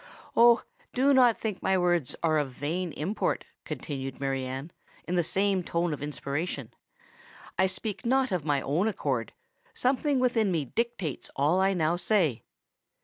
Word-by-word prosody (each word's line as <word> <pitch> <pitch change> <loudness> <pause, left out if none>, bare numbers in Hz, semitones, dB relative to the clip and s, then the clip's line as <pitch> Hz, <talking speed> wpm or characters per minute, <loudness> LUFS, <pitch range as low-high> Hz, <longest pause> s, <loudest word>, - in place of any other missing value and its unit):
"Oh! 235 0 +6 0.3
do 270 +3 +4
not 250 -4 +5
think 215 -4 -3
my 190 - +2
words 175 -6 +1
are 155 -2 +3
of 145 -2 -1
vain 160 +7 -3
import," 185 +8 -1 0.2
continued 135 -3 -5
Mary 135 -1 -1
Anne, 135 +5 -5 0.4
in 175 - -2
the 175 -1 +3
same 195 +2 +1
tone 170 -1 -1
of 145 - -6
inspiration. 145 -2 -3 0.9
"I 190 - +5
speak 205 +2 -4
not 265 +2 +2
of 180 -5 0
my 145 -3 +1
own 160 +11 +1
accord—something 245 - -2
within 235 -5 +2
me 160 -5 0
dictates 215 - -3
all 150 +7 +3
I 195 +1 +3
now 165 0 +1
say! 175 - +1
175 Hz, 150 wpm, -28 LUFS, 145-215 Hz, 0.9 s, Oh